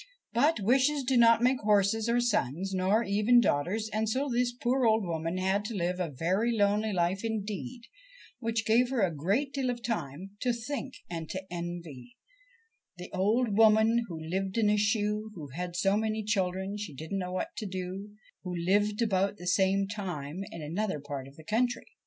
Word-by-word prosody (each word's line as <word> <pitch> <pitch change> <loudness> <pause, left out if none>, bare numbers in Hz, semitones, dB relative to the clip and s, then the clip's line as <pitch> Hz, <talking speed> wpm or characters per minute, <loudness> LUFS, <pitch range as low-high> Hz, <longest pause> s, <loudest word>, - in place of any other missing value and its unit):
But 280 +5 +3
wishes 265 +7 +2
do 260 +1 +1
not 230 -1 +6
make 255 +1 +3
horses 210 +2 +2
or 240 +1 +3
sons, 195 - 0
nor 190 +5 +2
even 210 +4 +4
daughters, 205 +3 +1
and 215 0 0
so 265 +6 0
this 245 0 +1
poor 250 +2 0
old 220 -2 +4
woman 165 +1 -2
had 190 +2 +1
to 220 - -4
live 180 0 -1
a 175 -3 -1
very 185 - 0
lonely 210 +1 +2
life 185 +2 0
indeed,, 220 +2 -4 0.6
which 225 -2 -1
gave 240 +3 +4
her 260 -4 0
a 175 -3 +1
great 200 - 0
deal 270 -2 -1
of 240 -1 -4
time 180 - -4
to 250 -1 +1
think 265 +3 -5
and 165 -2 -6
to 190 0 -4
envy 170 -8 -7 0.8
The 180 0 -9
old 215 +3 +1
woman 220 +2 +5
who 165 -3 -6
lived 190 +5 -3
in 210 -2 +3
a - - +3
shoe, 210 0 0
Who 150 -5 -8
had 175 +5 -5
so 195 +2 +2
many 220 0 -1
children 190 -1 -1
she 180 -9 -6
didn't 160 +7 -4
know 180 -1 -4
what 185 - -3
to 215 - -3
do, 190 +2 -6 0.3
who 180 -1 -5
lived 205 +5 +1
about 200 -1 +1
the 175 - -10
same 190 +2 +2
time 180 -5 -5
in 165 -2 -8
another 180 +2 -2
part 140 -2 -6
of 135 - -15
the 160 - -13
country. 240 +7 0
205 Hz, 190 wpm, -29 LUFS, 180-230 Hz, 0.8 s, not